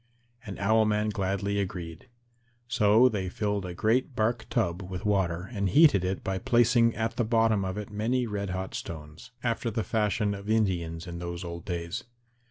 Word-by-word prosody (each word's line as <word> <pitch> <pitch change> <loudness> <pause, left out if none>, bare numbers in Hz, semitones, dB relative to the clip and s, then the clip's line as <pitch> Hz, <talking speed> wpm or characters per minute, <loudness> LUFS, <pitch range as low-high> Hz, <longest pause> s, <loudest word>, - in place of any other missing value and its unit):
And 100 - -6
Owl 110 +3 +3
man 105 0 +1
gladly 100 0 -1
agreed. 90 +1 -5 0.6
So 120 0 +5
they 100 -6 -2
filled 105 -1 -2
a 90 - -6
great 120 +6 +1
bark 110 +2 0
tub 85 +2 0
with 95 +2 -6
water 95 -3 0
and 100 -3 0
heated 125 - +6
it 95 +1 -2
by 95 -1 -2
placing 120 0 +3
at 115 +1 -2
the 120 - +2
bottom 115 -2 +2
of 95 +1 -3
it 105 -1 -6
many 120 +4 0
red 100 -3 -3
hot 95 +1 -4
stones, 80 +5 -8
after 115 0 0
the 110 0 -2
fashion 105 -1 0
of 100 +1 -7
Indians 85 -7 0
in 85 -1 -6
those 85 +1 -5
old 85 -1 -7
days. 85 +5 -4
100 Hz, 180 wpm, -28 LUFS, 90-110 Hz, 0.6 s, heated